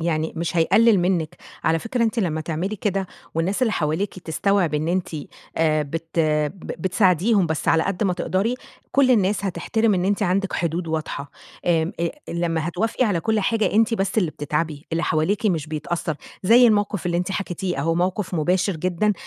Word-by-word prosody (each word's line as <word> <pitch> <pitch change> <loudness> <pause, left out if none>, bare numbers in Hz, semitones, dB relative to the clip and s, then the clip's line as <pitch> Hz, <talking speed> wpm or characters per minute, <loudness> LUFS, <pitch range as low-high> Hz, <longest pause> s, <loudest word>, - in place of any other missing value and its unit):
يعني 160 -1 -1
مش 170 +1 -2
هيقلِّل 220 +6 +5
منِّك، 175 -2 0 0.3
على 165 0 +3
فكرة 230 +6 -2
أنتِ 225 +1 -1
لمّا 165 -7 0
تعملي 170 +6 -3
كده، 195 -1 -1 0.3
والناس 185 +9 0
اللي 225 - +2
حواليكِ 165 +5 -1
تستوعب 180 0 0
إن 150 +2 0
أنتِ 180 +1 0 0.5
آآ، 155 -1 +2
بت 165 +3 -5
ب 155 +2 0
بتساعديهم 185 +1 +3
بس 160 -2 -2
على 160 - +4
قد 195 +3 -1
ما 185 - +2
تقدري، 195 +6 0 0.4
كُلّ 275 -1 +4
الناس 205 -3 +2
هتحترم 200 +4 +1
إن 180 -1 0
أنتِ 200 +2 +1
عندِك 195 +1 0
حدود 170 +1 -1
واضحة 155 -3 -4 0.3
آآ 165 -1 +1
آآ، 170 - +1 0.2
لمّا 165 -1 -1
هتوافقي 225 +8 0
على 200 -7 +1
كُلّ 220 +3 +1
حاجة 220 +2 +1
أنتِ 225 +2 +3
بس 195 0 0
اللي 180 -7 +1
بتتعبي، 150 0 -3
اللي 165 +1 0
حواليكِ 170 +8 +1
مش 165 -7 0
بيتأثّر، 155 0 -3 0.3
زي 235 +6 +7
الموقف 205 -4 +1
اللي 175 -1 0
أنتِ 180 +2 -1
حكيتيه 185 -2 -3
أهو، 165 +4 +1
موقف 185 +2 -1
مباشر 180 +3 +1
جدًا، 185 +5 +1
180 Hz, 180 wpm, -23 LUFS, 160-205 Hz, 0.5 s, زي